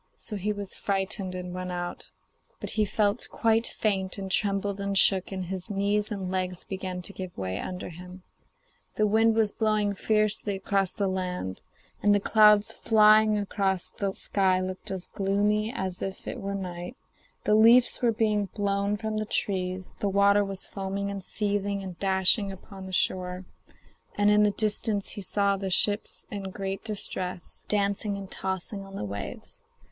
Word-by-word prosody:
So 215 Hz, -, -6 dB
he 205 Hz, +1 st, -1 dB
was 205 Hz, -2 st, -3 dB
frightened 195 Hz, -1 st, -2 dB
and 180 Hz, -1 st, -5 dB
went 185 Hz, 0 st, -4 dB
out; 175 Hz, 0 st, -4 dB, 0.5 s
but -, -, -5 dB
he 215 Hz, -1 st, +1 dB
felt 205 Hz, +2 st, 0 dB
quite 225 Hz, 0 st, +2 dB
faint, 195 Hz, -3 st, -1 dB
and 195 Hz, -1 st, -5 dB
trembled 200 Hz, 0 st, 0 dB
and 200 Hz, 0 st, -1 dB
shook, 190 Hz, -1 st, +4 dB
and 190 Hz, -1 st, -3 dB
his 185 Hz, +2 st, -6 dB
knees 205 Hz, +1 st, 0 dB
and 195 Hz, -4 st, -4 dB
legs 185 Hz, -1 st, -2 dB
began 185 Hz, -2 st, -5 dB
to 200 Hz, -, -3 dB
give 185 Hz, -2 st, -7 dB
way 95 Hz, 0 st, -3 dB
under 180 Hz, -1 st, -5 dB
him. 180 Hz, +2 st, -11 dB, 0.7 s
The 215 Hz, -, +2 dB
wind 220 Hz, +2 st, +4 dB
was 220 Hz, -2 st, +2 dB
blowing 215 Hz, -2 st, +1 dB
fiercely 215 Hz, 0 st, +1 dB
across 195 Hz, -1 st, +1 dB
the 200 Hz, -, +1 dB
land, 180 Hz, -, -3 dB, 0.4 s
and 205 Hz, 0 st, +5 dB
the -, -, +3 dB
clouds 210 Hz, 0 st, +5 dB
flying 215 Hz, -1 st, +5 dB
across 195 Hz, -2 st, 0 dB
the 200 Hz, -1 st, -2 dB
sky 190 Hz, -2 st, +2 dB
looked 185 Hz, 0 st, -4 dB
as 190 Hz, -2 st, -3 dB
gloomy 205 Hz, +2 st, +1 dB
as 185 Hz, -5 st, -4 dB
if 195 Hz, 0 st, -5 dB
it -, -, -4 dB
were 200 Hz, 0 st, -3 dB
night; 180 Hz, +4 st, -6 dB, 0.5 s
the 210 Hz, -, +2 dB
leaves 230 Hz, +3 st, +6 dB
were 240 Hz, -2 st, +4 dB
being 215 Hz, -2 st, +1 dB
blown 200 Hz, 0 st, 0 dB
from 220 Hz, 0 st, -3 dB
the 215 Hz, -, -2 dB
trees; 185 Hz, -2 st, -2 dB
the 205 Hz, -, 0 dB
water 200 Hz, +1 st, +4 dB
was 195 Hz, -1 st, -3 dB
foaming 200 Hz, 0 st, -3 dB
and 200 Hz, -1 st, -6 dB
seething 200 Hz, -1 st, -1 dB
and 185 Hz, -3 st, -8 dB
dashing 195 Hz, +1 st, +3 dB
upon 190 Hz, 0 st, -10 dB
the -, -, -8 dB
shore, 185 Hz, 0 st, 0 dB, 0.7 s
and 205 Hz, 0 st, +4 dB
in 210 Hz, 0 st, +5 dB
the 210 Hz, -, +5 dB
distance 210 Hz, 0 st, 0 dB
he 205 Hz, -, -5 dB
saw 200 Hz, +1 st, +1 dB
the 195 Hz, 0 st, -3 dB
ships 205 Hz, +3 st, +2 dB
in 195 Hz, -2 st, -4 dB
great 195 Hz, 0 st, -4 dB
distress, 185 Hz, -4 st, -4 dB
dancing 200 Hz, 0 st, 0 dB
and 195 Hz, -1 st, -8 dB
tossing 190 Hz, +1 st, -3 dB
on 195 Hz, 0 st, -11 dB
the 105 Hz, -, -3 dB
waves. 100 Hz, -1 st, -7 dB
200 Hz, 175 wpm, -27 LUFS, 185-210 Hz, 0.7 s, leaves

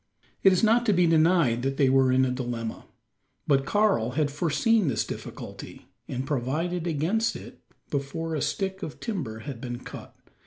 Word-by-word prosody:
It 195 Hz, -, +6 dB
is 185 Hz, -, +2 dB
not 230 Hz, +2 st, +4 dB
to 210 Hz, -, +5 dB
be 180 Hz, -1 st, +4 dB
denied 160 Hz, -7 st, +3 dB
that 135 Hz, +1 st, -2 dB
they 140 Hz, -, +4 dB
were 130 Hz, 0 st, +4 dB
in 130 Hz, 0 st, +4 dB
a 125 Hz, -, -1 dB
dilemma. 120 Hz, -3 st, -4 dB, 0.6 s
But 135 Hz, -1 st, +2 dB
Karl 200 Hz, -, +2 dB
had 150 Hz, -2 st, +1 dB
foreseen 175 Hz, +7 st, +2 dB
this 110 Hz, -5 st, 0 dB
difficulty, -, -, -9 dB, 0.2 s
and 130 Hz, +1 st, -3 dB
provided 155 Hz, +6 st, -2 dB
against 175 Hz, +9 st, 0 dB
it -, -, -10 dB, 0.3 s
before 155 Hz, +4 st, -3 dB
a 155 Hz, -, -1 dB
stick 190 Hz, -1 st, -2 dB
of 150 Hz, -, -6 dB
timber 140 Hz, -, -4 dB
had 130 Hz, -2 st, -7 dB
been 120 Hz, -1 st, -5 dB
cut. -, -, -10 dB
150 Hz, 170 wpm, -26 LUFS, 130-180 Hz, 0.6 s, It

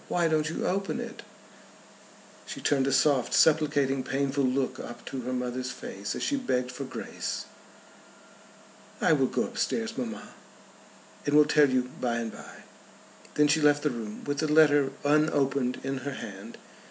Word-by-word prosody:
"Why 170 Hz, -1 st, +1 dB
don't 155 Hz, -1 st, +1 dB
you 165 Hz, -, -3 dB
open 195 Hz, +1 st, -1 dB
it?" -, -, -7 dB, 1.3 s
She -, -, -6 dB
turned 135 Hz, -2 st, +1 dB
a -, -, +1 dB
soft 135 Hz, -1 st, +3 dB
supplicating 145 Hz, -4 st, +3 dB
painful 140 Hz, +1 st, -1 dB
look 130 Hz, 0 st, 0 dB
up 120 Hz, 0 st, -9 dB
to 135 Hz, -, -5 dB
her 125 Hz, +1 st, -4 dB
mother's 125 Hz, 0 st, -3 dB
face 100 Hz, -4 st, -6 dB
as -, -, -4 dB
she 285 Hz, -, 0 dB
begged 125 Hz, -, -1 dB
for 135 Hz, +2 st, -6 dB
grace. 130 Hz, -, -5 dB, 1.5 s
"I -, -, +4 dB
will -, -, +3 dB
go -, -, 0 dB
up -, -, -6 dB
stairs, -, -, -1 dB
mamma, -, -, -5 dB, 1.0 s
and 145 Hz, -, +2 dB
will 150 Hz, 0 st, +7 dB
tell 150 Hz, -1 st, +4 dB
you 130 Hz, -1 st, 0 dB
by 120 Hz, -2 st, 0 dB
and 115 Hz, -1 st, -3 dB
by." -, -, -12 dB, 0.7 s
Then 150 Hz, 0 st, +5 dB
she 155 Hz, +2 st, +3 dB
left 145 Hz, -1 st, +4 dB
the 150 Hz, -, +1 dB
room 110 Hz, -3 st, -7 dB
with 145 Hz, 0 st, -2 dB
the 155 Hz, -1 st, 0 dB
letter 145 Hz, -3 st, +5 dB, 0.2 s
unopened 140 Hz, -4 st, +2 dB
in 135 Hz, 0 st, -2 dB
her 140 Hz, +2 st, -5 dB
hand. 100 Hz, -1 st, -8 dB
135 Hz, 165 wpm, -28 LUFS, 125-150 Hz, 1.5 s, will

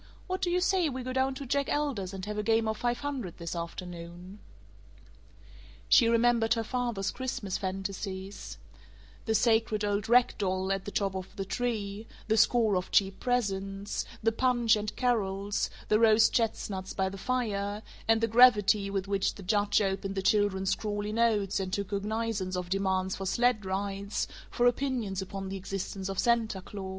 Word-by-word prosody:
What 370 Hz, 0 st, -3 dB
do 365 Hz, -, +1 dB
you 360 Hz, +1 st, +1 dB
say 370 Hz, -3 st, +2 dB
we 260 Hz, -1 st, -5 dB
go 255 Hz, +1 st, -4 dB
down 265 Hz, 0 st, +1 dB
to 280 Hz, -, -6 dB
Jack 280 Hz, +2 st, 0 dB
Elder's 270 Hz, -11 st, -1 dB
and 190 Hz, -1 st, -6 dB
have 210 Hz, 0 st, -4 dB
a -, -, +2 dB
game 225 Hz, +1 st, +2 dB
of 220 Hz, 0 st, -1 dB
five 240 Hz, +1 st, -1 dB
hundred 265 Hz, -, -4 dB
this 170 Hz, 0 st, -5 dB
afternoon?" 175 Hz, +2 st, -7 dB, 1.5 s
She 230 Hz, -, +6 dB
remembered 235 Hz, 0 st, +3 dB
her 225 Hz, -, -1 dB
father's 235 Hz, -4 st, -2 dB
Christmas 240 Hz, -7 st, -3 dB
fantasies: 195 Hz, 0 st, -5 dB, 0.7 s
the 220 Hz, -, +1 dB
sacred 220 Hz, -2 st, +2 dB
old 205 Hz, +1 st, -1 dB
rag 245 Hz, +1 st, +5 dB
doll 190 Hz, -1 st, 0 dB
at 195 Hz, -1 st, -2 dB
the 205 Hz, -, -5 dB
top 195 Hz, -2 st, 0 dB
of 185 Hz, -1 st, -6 dB
the 195 Hz, -, -4 dB
tree, 215 Hz, -2 st, -3 dB, 0.2 s
the 220 Hz, -, +2 dB
score 225 Hz, -2 st, +4 dB
of 180 Hz, -, -3 dB
cheap 195 Hz, -1 st, +2 dB
presents, 200 Hz, -5 st, -1 dB, 0.2 s
the 225 Hz, -, +3 dB
punch 240 Hz, -1 st, +3 dB
and 210 Hz, 0 st, -4 dB
carols, 205 Hz, -5 st, 0 dB, 0.2 s
the 215 Hz, -, +3 dB
roast 220 Hz, -1 st, +5 dB
chestnuts 200 Hz, -4 st, -1 dB
by 190 Hz, -1 st, +1 dB
the 190 Hz, -, -5 dB
fire, 210 Hz, -4 st, -2 dB, 0.2 s
and 225 Hz, 0 st, +4 dB
the 230 Hz, -, +3 dB
gravity 215 Hz, -4 st, +5 dB
with 195 Hz, -1 st, -2 dB
which 200 Hz, -1 st, 0 dB
the 200 Hz, -, -10 dB
judge 205 Hz, +2 st, +2 dB
opened 195 Hz, 0 st, -2 dB
the 195 Hz, -, -2 dB
children's 195 Hz, -2 st, +2 dB
scrawly 205 Hz, +1 st, -2 dB
notes 215 Hz, -4 st, +2 dB
and 190 Hz, -1 st, -3 dB
took 200 Hz, 0 st, -2 dB
cognizance 205 Hz, -2 st, -2 dB
of 180 Hz, -1 st, -4 dB
demands 190 Hz, -1 st, 0 dB
for 195 Hz, -, -5 dB
sled 240 Hz, 0 st, +2 dB
rides, 200 Hz, +1 st, -2 dB, 0.2 s
for 245 Hz, -, +1 dB
opinions 245 Hz, -6 st, 0 dB
upon 195 Hz, 0 st, -6 dB
the 195 Hz, -, -4 dB
existence 195 Hz, 0 st, -5 dB
of 195 Hz, -, -4 dB
Santa 230 Hz, -4 st, +1 dB
Claus. 190 Hz, +1 st, -7 dB
205 Hz, 175 wpm, -29 LUFS, 195-235 Hz, 1.5 s, She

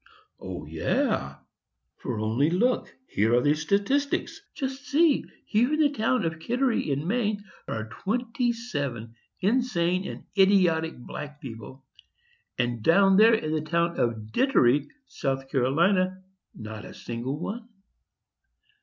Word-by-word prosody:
"O -, -, -7 dB
yes! 70 Hz, 0 st, -1 dB, 0.6 s
for -, -, -4 dB
only 115 Hz, +8 st, +1 dB
look; 235 Hz, +9 st, +1 dB, 0.2 s
here 110 Hz, +3 st, +2 dB
are -, -, +5 dB
the 145 Hz, +3 st, +3 dB
statistics. 200 Hz, -, 0 dB
Just 270 Hz, +1 st, -4 dB
see; 295 Hz, +1 st, +3 dB, 0.2 s
here 235 Hz, +6 st, +2 dB
in -, -, -3 dB
the 295 Hz, -2 st, +4 dB
town 240 Hz, -5 st, +1 dB
of 160 Hz, -1 st, -3 dB
Kittery, 245 Hz, -, 0 dB
in 140 Hz, +3 st, -1 dB
Maine, 210 Hz, 0 st, 0 dB, 0.2 s
are 110 Hz, 0 st, -4 dB
twenty 235 Hz, -, -1 dB
seven 140 Hz, -, -4 dB, 0.3 s
insane 190 Hz, -5 st, +1 dB
and -, -, -7 dB
idiotic 180 Hz, -5 st, +3 dB
black 150 Hz, +4 st, -8 dB
people, 130 Hz, 0 st, -10 dB, 0.7 s
and 120 Hz, -2 st, -1 dB
down 195 Hz, -, +5 dB
here 225 Hz, +1 st, +7 dB
in 155 Hz, -8 st, -2 dB
the 155 Hz, -1 st, 0 dB
town 170 Hz, +2 st, 0 dB
of 110 Hz, -2 st, -1 dB
Dittery, 145 Hz, -, +3 dB, 0.2 s
South 135 Hz, -, -3 dB
Carolina, 185 Hz, +8 st, +2 dB, 0.3 s
not 110 Hz, -1 st, -8 dB
a -, -, -10 dB
single 120 Hz, +5 st, -4 dB
one. 225 Hz, +6 st, -5 dB
170 Hz, 130 wpm, -26 LUFS, -, 0.7 s, here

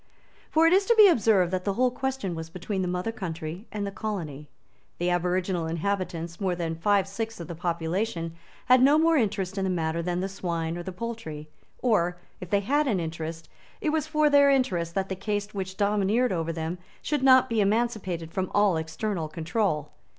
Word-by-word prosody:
For 320 Hz, +1 st, +4 dB
it 330 Hz, -, +5 dB
is 390 Hz, +1 st, +3 dB
to 470 Hz, -, +5 dB
be 430 Hz, -2 st, +9 dB
observed 215 Hz, -, +3 dB
that 185 Hz, 0 st, -1 dB
the 200 Hz, -, 0 dB
whole 250 Hz, +4 st, +2 dB
question 265 Hz, -7 st, -3 dB
was 160 Hz, 0 st, -6 dB
between 185 Hz, +3 st, -3 dB
the 180 Hz, -, -1 dB
mother 180 Hz, +5 st, -2 dB
country 170 Hz, -1 st, -6 dB
and 205 Hz, -1 st, -3 dB
the 200 Hz, -, -4 dB
colony. 165 Hz, -10 st, -5 dB, 0.5 s
The 175 Hz, +1 st, 0 dB
aboriginal 180 Hz, -1 st, 0 dB
inhabitants, 170 Hz, 0 st, -3 dB
more 185 Hz, -2 st, +1 dB
than 170 Hz, -2 st, -2 dB
five 195 Hz, +3 st, +2 dB
sixths 225 Hz, +2 st, -5 dB
of 170 Hz, -, -6 dB
the 170 Hz, -, -5 dB
population, 170 Hz, +1 st, -2 dB, 0.3 s
had 255 Hz, 0 st, +6 dB
no 280 Hz, +3 st, +6 dB
more 325 Hz, +1 st, +4 dB
interest 200 Hz, -, 0 dB
in -, -, 0 dB
the 190 Hz, -, 0 dB
matter 165 Hz, -2 st, -1 dB
than 175 Hz, +1 st, -2 dB
the 190 Hz, -, -1 dB
swine 170 Hz, -4 st, -3 dB
or 175 Hz, -, -4 dB
the 190 Hz, -, -6 dB
poultry; 180 Hz, -8 st, -6 dB, 0.3 s
or, 180 Hz, -8 st, +2 dB, 0.2 s
if 180 Hz, -, -8 dB
they 200 Hz, +1 st, +2 dB
had 290 Hz, +8 st, +1 dB
an 210 Hz, -7 st, +1 dB
interest, 165 Hz, 0 st, -5 dB, 0.3 s
it 310 Hz, -, 0 dB
was 310 Hz, -1 st, 0 dB
for 305 Hz, -1 st, +3 dB
their 285 Hz, -1 st, +6 dB
interest 180 Hz, -12 st, +1 dB
that 195 Hz, -1 st, 0 dB
the 190 Hz, -, -3 dB
caste 205 Hz, +1 st, -3 dB
which 190 Hz, -1 st, -5 dB
domineered 210 Hz, +4 st, +2 dB
over 165 Hz, -2 st, -1 dB
them 165 Hz, +2 st, -4 dB, 0.2 s
should 295 Hz, -3 st, 0 dB
not 260 Hz, -1 st, +6 dB
be 230 Hz, -3 st, +1 dB
emancipated 200 Hz, -6 st, 0 dB
from 185 Hz, +1 st, -2 dB
all 205 Hz, -4 st, +4 dB
external 160 Hz, +2 st, -3 dB
control. 160 Hz, -1 st, -1 dB
190 Hz, 200 wpm, -27 LUFS, 170-225 Hz, 0.5 s, be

